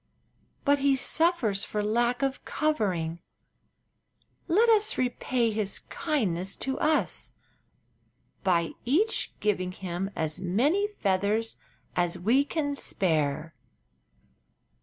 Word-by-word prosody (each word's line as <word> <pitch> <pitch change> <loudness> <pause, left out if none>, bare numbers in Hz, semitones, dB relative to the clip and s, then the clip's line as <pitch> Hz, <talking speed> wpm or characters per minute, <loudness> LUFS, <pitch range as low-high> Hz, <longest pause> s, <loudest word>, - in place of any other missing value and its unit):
But 285 0 +4
he 275 0 +3
suffers 265 - +2
for 210 -1 -2
lack 240 +4 +1
of 270 0 -1
covering. 185 - -1 1.3
Let 420 +7 +4
us 430 -2 +4
repay 245 -1 0
his 210 -2 -1
kindness 195 - -2
to 265 0 -2
us 310 0 +1 1.1
by 170 -3 +2
each 370 - +1
giving 185 -4 0
him 185 +1 -4
as 160 +2 -1
many 265 - +2
feathers 210 - 0 0.4
as 175 0 0
we 230 +10 +3
can 290 -2 -2
spare." 155 - 0
220 Hz, 100 wpm, -28 LUFS, 185-285 Hz, 1.3 s, But